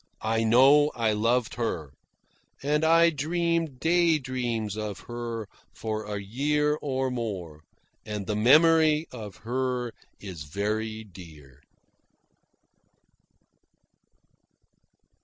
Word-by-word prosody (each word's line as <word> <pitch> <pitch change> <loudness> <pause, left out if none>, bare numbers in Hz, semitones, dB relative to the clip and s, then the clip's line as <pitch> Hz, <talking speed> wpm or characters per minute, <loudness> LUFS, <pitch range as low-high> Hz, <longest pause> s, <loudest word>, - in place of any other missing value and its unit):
I 115 +1 +1
know 135 +6 +5
I 115 -2 +1
loved 115 +3 +1
her; 85 - -3 0.7
and 150 +2 +1
I 165 +1 +5
dreamed 165 -1 -1
day 170 0 +3
dreams 120 -6 -3
of 105 -2 -5
her 120 -2 -5 0.3
for 110 -1 -4
a 105 -1 -4
year 150 +8 0
and 130 -2 -1
more, 95 -10 -5 0.4
and 105 -2 -5
the 105 - -2
memory 155 +6 +5
of 105 -6 -8
her 125 -1 -2 0.3
is 95 -6 -8
very 110 +6 -3
dear. 80 - -14
120 Hz, 100 wpm, -27 LUFS, 105-150 Hz, 0.7 s, know